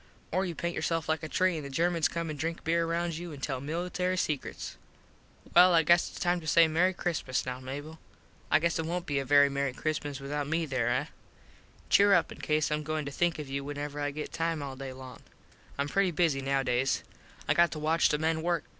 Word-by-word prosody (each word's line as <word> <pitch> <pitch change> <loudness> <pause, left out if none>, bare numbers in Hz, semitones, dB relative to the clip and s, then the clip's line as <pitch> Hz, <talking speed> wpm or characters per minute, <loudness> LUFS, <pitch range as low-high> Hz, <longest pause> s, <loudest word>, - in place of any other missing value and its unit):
Or 185 +3 +1
you 170 - -5
paint 170 +1 -3
yourself 165 0 -1
like 160 0 0
a 155 - -4
tree 185 -2 +2
an 155 - -5
the 140 - -6
Germans 165 +3 +1
come 170 -1 -3
an - - -5
drink 165 +3 -4
beer 165 +1 +1
round 170 -1 -1
you 175 0 -6
an 145 - -9
tell 135 -2 -3
military 180 +4 -2
sekruts. 150 -5 -3 0.8
Well 180 0 +8
I 165 - +5
guess 170 +3 +4
its - - -10
time 175 0 +1
to 160 - -9
say 165 +1 +6
Mery 175 +4 +2
Xmas 150 -7 -1
now 125 0 -4
Mable. 145 +5 -7 0.5
I - - +5
guess 170 +1 0
it 160 - -2
wont 175 +1 -2
be 145 -4 0
a 135 - -3
very 145 +1 +6
Mery 140 -1 -1
Xmas 145 -1 -3
withut 145 +1 -3
me 165 +1 0
there, 130 -5 0
eh? - - +1 0.9
Cheer 200 0 +6
up 175 - +1
cause 150 0 +1
Im 150 0 0
goin 155 0 -3
to 140 - -5
think 170 +4 0
of 150 -2 -6
you 140 +1 -3
whenever 145 +1 -5
I 145 0 0
get 150 +1 -6
time 165 -2 -1
all 135 -1 -6
day 135 0 -6
long. 130 -1 -10 0.6
Im 140 0 0
pretty 195 +4 +2
busy 160 -5 +1
nowdays. 135 -1 0 0.4
I - - +4
got 170 0 +4
to - - -6
watch 155 +2 +2
the 150 - +1
men 160 +1 0
work. 170 0 0
155 Hz, 225 wpm, -29 LUFS, 140-170 Hz, 0.9 s, Well